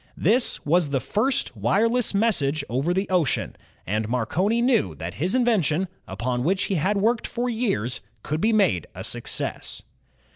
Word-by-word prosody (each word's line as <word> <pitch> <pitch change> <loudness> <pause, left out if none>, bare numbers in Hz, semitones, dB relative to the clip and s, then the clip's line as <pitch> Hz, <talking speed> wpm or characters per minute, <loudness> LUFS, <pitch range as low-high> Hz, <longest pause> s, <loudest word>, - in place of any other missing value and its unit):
This 235 +8 +2
was 165 0 +3
the 140 -1 0
first 225 - -1
wireless 230 +3 +2
message 155 -10 +2
over 135 +8 -1
the 190 +2 0
ocean, 175 -8 0 0.3
and 110 +3 -2
Marconi 170 - 0
knew 235 - +2
that 85 +4 -6
his 180 - -1
invention, 190 - +2 0.2
upon 125 0 -2
which 190 +5 +1
he - - -1
had 190 +5 +1
worked 225 +3 +1
for 245 +1 -2
years, 195 - -1 0.2
could 155 +2 -2
be 225 - +3
made 110 - +2
a - - -6
success. - - -3
180 Hz, 155 wpm, -24 LUFS, 130-220 Hz, 0.3 s, was